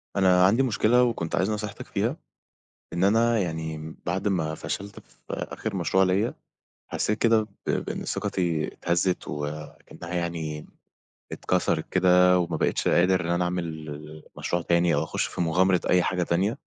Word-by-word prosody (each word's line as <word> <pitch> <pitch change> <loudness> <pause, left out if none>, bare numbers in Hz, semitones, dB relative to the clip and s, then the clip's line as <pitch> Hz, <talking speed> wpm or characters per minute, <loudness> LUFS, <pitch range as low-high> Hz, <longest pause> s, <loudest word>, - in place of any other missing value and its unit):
أنا 90 -2 +5
عندي 115 +8 +4
مشكلة 125 0 +3
وكنت 110 -9 -1
عايز 95 - +1
نصيحتِك 105 -1 -5
فيها، - - -1 0.8
إن 85 +2 +1
أنا 115 +3 +3
يعني 80 -3 -4
بعد 95 +4 0
ما 80 -5 -1
فشلت 100 +5 -6
في - - -27
آخر 110 -3 -4
مشروع 95 +2 +2
ليّا، 95 +5 +1 0.6
حسيت 105 +1 0
كده 115 -1 +4 0.2
ب - - +1
بإن - - -3
ثقتي 85 -4 -1
اتهزّت 85 0 -1
وأكنّها 75 +4 -7
يعني 80 -3 -3 0.7
اتكسرت - - -1
كده 90 0 +5
وما 85 -2 -1
بقيتش - - 0
قادر 90 +1 +3
إن 85 - -4
أنا 85 +1 +1
أعمل 90 0 -1
ال 75 -1 -8
مشروع 85 0 -1
تاني 85 -1 +2
أو 75 - +1
أخش - - -2
في - - -4
مغامرة 90 +2 +3
أي 90 -1 +4
حاجة 90 0 0
تانية. 95 +6 0
90 Hz, 155 wpm, -26 LUFS, 80-95 Hz, 0.8 s, أنا